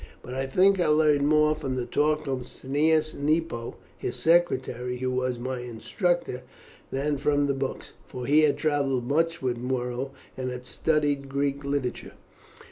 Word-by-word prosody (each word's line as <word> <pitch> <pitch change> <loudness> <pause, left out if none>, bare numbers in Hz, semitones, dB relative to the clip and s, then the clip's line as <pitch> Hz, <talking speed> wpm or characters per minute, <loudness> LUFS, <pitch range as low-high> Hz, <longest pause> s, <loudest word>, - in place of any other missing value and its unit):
But 125 - -7
I 135 +1 -2
think 190 +7 +4
I 175 - +2
learned 150 -2 +4
more 150 0 +4
from 140 -4 -4
the 125 -1 -2
talk 150 +5 +1
of 135 -2 -1
Cneius 155 +4 +1
Nepo, 150 -5 -1 0.2
his - - -3
secretary, 130 -7 +1
who 130 +1 -1
was 130 -1 -1
my 130 +1 -4
instructor, 125 - -2 0.5
than 145 +2 -1
from 145 0 +2
the 140 - +1
books, 135 0 -4 0.2
for 125 -1 -6
he 150 +3 +5
had 150 -2 +3
travelled 140 -5 0
much 165 +2 +1
with 125 -2 0
Muro, 125 +1 -2 0.3
and 130 -1 -3
had 125 0 -6
studied 145 -3 0
Greek 140 +1 -1
literature." 140 -3 -3
140 Hz, 160 wpm, -27 LUFS, 130-150 Hz, 0.5 s, he